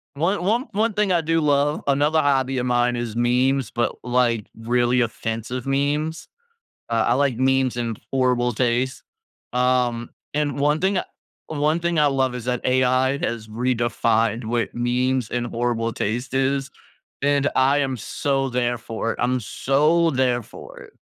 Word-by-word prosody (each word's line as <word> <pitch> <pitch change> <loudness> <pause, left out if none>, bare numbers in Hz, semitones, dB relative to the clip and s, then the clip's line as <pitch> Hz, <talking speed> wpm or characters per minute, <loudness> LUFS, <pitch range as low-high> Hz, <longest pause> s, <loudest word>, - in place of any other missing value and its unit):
One 175 +5 0
one 230 +7 +1
one 215 +2 +1
thing 210 -1 +1
I 175 -2 +3
do 165 +1 +1
love 145 0 +2
another 145 +3 +3
hobby 135 -2 +1
of 125 - -2
mine 120 0 +2
is 120 -2 -4
memes, 125 +1 +1
but, 120 0 -1
like, 120 -3 +1
really 120 +2 +1
offensive 115 +1 -3
memes. 145 +4 -1 0.6
Uh, 115 -1 +1
I 120 - +3
like 135 -2 +1
memes 130 -1 +2
in 115 -2 -2 0.2
horrible 125 -2 +2
taste. 125 +3 0 0.5
Um, 125 -2 +1 0.2
and 145 -1 -1
1 150 +2 +2
thing 190 +1 +2 0.5
1 155 +2 0
thing 170 -2 0
I 150 - +5
love 135 -2 +1
is 125 -2 -6
that 125 -1 -1
AI 130 +1 +2
has 115 -2 -3
redefined 115 -1 0
what 115 +1 -1
memes 125 0 0
and 120 -1 -2
horrible 115 -1 -1
taste 120 +5 -3
is, 135 +1 0 0.5
and 140 0 +2
I 135 +2 +4
am 135 -2 -1
so 135 +3 -1
there 120 -1 0
for 115 0 -3
it, - - -10
I'm 125 +1 +1
so 150 +9 +2
there 125 -3 +1
for - - -12
it. - - -14
130 Hz, 160 wpm, -22 LUFS, 120-140 Hz, 0.6 s, I